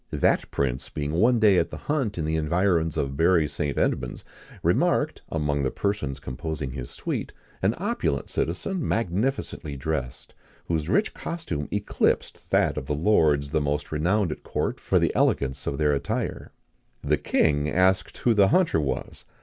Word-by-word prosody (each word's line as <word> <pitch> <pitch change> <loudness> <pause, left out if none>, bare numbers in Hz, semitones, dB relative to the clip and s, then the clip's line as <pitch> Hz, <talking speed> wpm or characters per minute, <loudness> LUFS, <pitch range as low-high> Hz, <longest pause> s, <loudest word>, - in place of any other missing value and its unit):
That - - +1
prince 65 -2 -2
being 75 -1 -3
one 115 +10 +4
day 105 -4 +5
at 85 0 0
the - - -7
hunt 135 -10 -1
in 80 - -1
the 80 +1 0
environs 80 0 +1
of 70 -1 -1
Bury 85 0 +4
St. 75 -1 -3
Edmunds, - - -1 0.4
remarked, - - +2
among 75 -3 0
the 65 - +1
persons 75 -10 -2
composing 70 +1 -4
his 65 -2 -6
suite, - - -4 0.3
an - - +2
opulent 70 -1 -1
citizen 150 - -2
magnificently 100 - -1
dressed, 65 -3 -4 0.3
whose 80 -1 -1
rich 210 - +2
costume 160 - -4
eclipsed 105 0 -1
that - - +2
of 65 - -4
the 75 - 0
lords 75 -5 +3
the 80 -1 +1
most 75 +1 -2
renowned 85 +4 +1
at - - -6
court - - -2
for - - +1
the - - +2
elegance 65 0 +1
of 70 - -1
their 75 -1 +2
attire. 70 - -3 0.5
The 75 +1 +2
king 75 +1 +1
asked 95 +2 +2
who 120 - +2
the 100 -2 +5
hunter 165 - +3
was. 65 -3 -4
80 Hz, 165 wpm, -25 LUFS, 70-95 Hz, 0.5 s, day